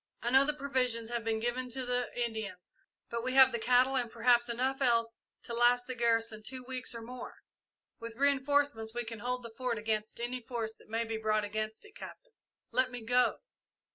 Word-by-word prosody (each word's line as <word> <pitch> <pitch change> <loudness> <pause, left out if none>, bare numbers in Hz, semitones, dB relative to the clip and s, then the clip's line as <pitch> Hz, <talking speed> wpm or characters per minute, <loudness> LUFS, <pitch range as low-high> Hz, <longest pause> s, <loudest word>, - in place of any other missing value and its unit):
I 240 - 0
know 265 +2 +6
the 300 +1 +1
provisions 250 -5 -1
have 235 -1 -2
been 220 0 0
given 245 +2 -2
to 255 +1 -2
the 245 0 -1
Indians, 220 -6 -4 0.4
but 235 0 -2
we 255 +1 -1
have 265 0 +8
the 235 - -2
cattle 250 +3 +4
and 245 -3 0
perhaps 240 +1 +3
enough 260 +3 -1
else 230 -3 +2 0.3
to 235 - -6
last 245 +1 +4
the 255 - -4
garrison 230 -2 +1
two 255 +3 -6
weeks 255 -2 -2
or 230 - -6
more. 250 +1 -8 0.6
With 230 -1 -7
reinforcements 280 -4 +1
we 240 - -1
can 225 -1 -7
hold 250 +2 -3
the 230 -1 -9
Fort 250 -1 -2
against 215 0 -2
any 245 +1 -3
force 230 -2 -4
that - - -20
may 225 +1 0
be 225 0 -3
brought 215 -1 +1
against 215 - -4
it. 415 - -17
Captain - - -11 0.4
let 255 0 +3
me 245 -2 -7
go!" 245 +2 +2
240 Hz, 200 wpm, -32 LUFS, 225-255 Hz, 0.6 s, have